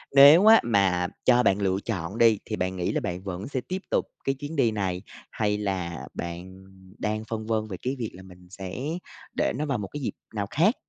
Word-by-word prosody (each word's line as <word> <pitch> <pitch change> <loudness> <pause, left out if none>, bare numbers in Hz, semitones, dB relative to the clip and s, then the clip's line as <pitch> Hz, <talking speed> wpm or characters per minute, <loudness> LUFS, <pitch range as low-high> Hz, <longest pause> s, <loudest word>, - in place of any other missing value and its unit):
nếu 145 +8 +9
á 225 +1 +9
mà 95 -6 +2 0.2
cho 125 0 +5
bạn 100 +1 +3
lựa 95 -1 +1
chọn 95 -2 -3
đi, 115 -3 +5
thì 110 - -3
bạn 95 -1 -2
nghĩ 90 -1 -1
là - - -1
bạn 90 +1 -4
vẫn 95 -1 -5
sẽ 130 -2 -2
tiếp 185 +1 -3
tục - - +2 0.2
cái 135 - 0
chuyến 145 +4 -7
đi 120 -6 +3
này, 95 -4 -2 0.3
hay 105 -1 0
là 95 -5 -3
bạn 90 +2 -7 0.4
đang 110 +1 -1
phân 110 -1 -4
vân 110 -1 0
về 95 -4 -6
cái 130 +2 -2
việc 115 - -3
là 95 - -11
mình 90 -1 -15
sẽ 95 -1 -7 0.6
để - - +1
nó 150 +4 -1
vào 140 -4 0
một 100 -2 -4
cái 145 - -4
dịp 130 - -2 0.2
nào 100 -2 -2
khác? 190 - +3
105 Hz, 225 wpm, -26 LUFS, 95-125 Hz, 0.6 s, nếu